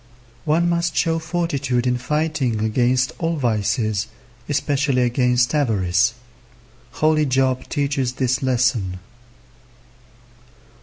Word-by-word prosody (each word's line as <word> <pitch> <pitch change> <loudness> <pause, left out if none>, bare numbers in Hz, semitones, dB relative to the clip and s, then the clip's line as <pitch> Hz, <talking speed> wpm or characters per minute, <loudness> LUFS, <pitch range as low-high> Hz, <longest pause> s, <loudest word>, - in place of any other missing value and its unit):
One 165 +3 +2
must 170 0 0
show 165 0 +1
fortitude 145 -7 -1
in 125 -1 +1
fighting 150 -5 -1
against 125 +4 +1
all 165 0 -1
vices, 110 -4 0 0.4
especially 140 -3 +1
against 125 0 +2
avarice. 110 - +1 0.8
Holy 155 -1 +2
Job 130 0 0
teaches 140 -4 -1
this 130 -1 0
lesson. 125 -8 0
130 Hz, 95 wpm, -21 LUFS, 120-150 Hz, 0.8 s, One